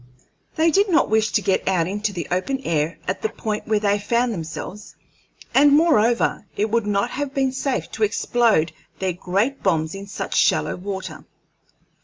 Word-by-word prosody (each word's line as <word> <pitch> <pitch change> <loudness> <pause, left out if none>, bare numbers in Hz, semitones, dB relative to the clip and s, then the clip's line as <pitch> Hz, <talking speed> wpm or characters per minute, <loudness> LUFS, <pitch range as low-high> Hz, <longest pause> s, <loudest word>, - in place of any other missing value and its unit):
They 325 +1 +3
did 400 +4 +3
not 325 - +3
wish 220 0 +2
to 210 - +2
get 190 - 0
out 180 -3 +2
into 205 +2 -2
the 175 -6 -5
open 190 +10 0
air 160 -2 -1
at - - -2
the 440 - 0
point 215 - -4
where 215 -1 +2
they 205 0 +1
found 235 +3 0
themselves; 180 +4 -7 0.6
and, 285 +1 +6
moreover, 240 - +3
it 210 +1 0
would 230 -2 +1
not 205 +3 0
have 285 0 -4
been 270 -1 +1
safe 255 - -2
to 220 - -2
explode 215 -5 +2 0.3
their 190 -1 -1
great 200 +10 -1
bombs 160 -4 0
in 195 0 -8
such 205 - -5
shallow - - +2
water. 190 +1 -6
210 Hz, 175 wpm, -22 LUFS, 190-245 Hz, 0.6 s, and